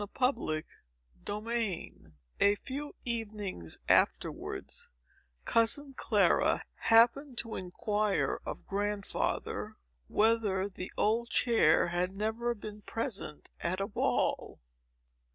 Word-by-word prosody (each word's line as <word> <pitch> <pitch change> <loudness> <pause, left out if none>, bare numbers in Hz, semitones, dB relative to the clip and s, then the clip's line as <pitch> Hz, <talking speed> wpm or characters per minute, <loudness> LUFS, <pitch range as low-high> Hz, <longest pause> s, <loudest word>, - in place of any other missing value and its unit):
Chapter 235 - +1 0.6
VII 215 -3 -2 0.5
A 200 0 +5
few 280 +6 -6
evenings 210 - -3
afterwards, - - 0 0.6
cousin 270 +5 +3
Clara - - +3
happened 240 +4 +4
to 230 -2 -3
inquire 205 +3 0
of - - -6
Grandfather, 205 0 -2 0.3
whether 210 -3 +2
the 185 -2 -7
old 230 +3 +2
chair 220 -10 +4
had 180 +2 -1
never 225 +3 -1
been 210 0 -8
present 215 - -5
at 185 +2 -1
a 195 - 0
ball. 200 - 0
215 Hz, 95 wpm, -31 LUFS, 195-235 Hz, 0.6 s, A